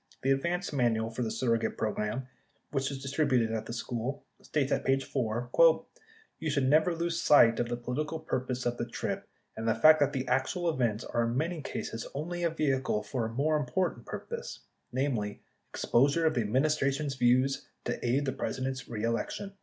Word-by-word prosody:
The 135 - +3
advance 170 +6 0
manual 115 -4 +1
for 120 - -4
the 115 - 0
surrogate 115 -2 0
program, 105 +3 -1
60 130 - -17 0.4
which 135 -1 0
was 135 -1 -6
distributed 135 -5 +1
at 110 -1 -3
the - - -5
school, 125 +3 -4 0.2
states 145 -2 -1
at - - +1
page 135 0 +1
4:... 120 +1 -2
[Y]ou 440 - +1
should 140 -3 +1
never 155 +5 +4
lose 170 0 -1
sight 115 -6 +6
of 120 - 0
the 120 - -2
political 150 +6 -3
purpose 130 -4 -3
of 120 0 0
the 120 - -3
trip - - -3 0.3
and 110 +1 -4
the 115 - +3
fact 155 0 +7
that 145 -1 +3
the 135 -2 -3
actual 175 +7 0
events 120 -6 0
are 120 0 0
in 115 +2 -1
many 165 +2 -1
cases 115 -5 -5
only 175 +5 -3
a 170 - +2
vehicle 135 -8 0
for 115 +2 -2
a 115 - -7
more 150 +5 +1
important 150 -2 -1
purpose - - -6
— - - -48
namely 120 -6 -1 0.3
ex - - -4
posure 140 +7 +3
of 160 - +3
the 125 - +1
Administration's 140 +4 +1
views 130 +1 +2 0.2
to - - -3
aid 130 +4 +1
the 135 - 0
President's 130 -1 -3
re 110 -2 -4
election. 115 - -2
135 Hz, 195 wpm, -30 LUFS, 120-155 Hz, 0.4 s, fact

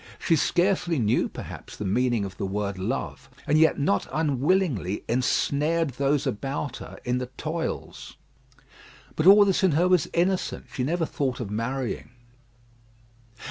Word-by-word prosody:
She 165 - +2
scarcely 175 +1 +1
knew, 115 -1 +1
perhaps, - - -9
the 105 - -4
meaning 120 +1 +1
of 95 -1 -8
the 100 - -2
word 100 -1 -3
love, 115 +9 -4 0.2
and 150 +1 +3
yet 160 - +4
not 120 -8 +1
unwillingly 145 - 0
ensnared 145 +6 +1
those 140 +2 0
about 135 +6 -3
her - - -10
in 125 0 0
the 125 - -4
toils. 160 +1 -5 1.0
But 155 - +1
all 205 +1 +9
this 195 -1 +1
in 185 -5 +4
her 170 +5 +3
was 180 -5 +2
innocent. 180 +2 0
She 125 - -2
never 165 +5 0
thought 135 -4 -2
of 110 -5 -5
marrying. 120 +4 -3
140 Hz, 145 wpm, -26 LUFS, 120-165 Hz, 1.0 s, all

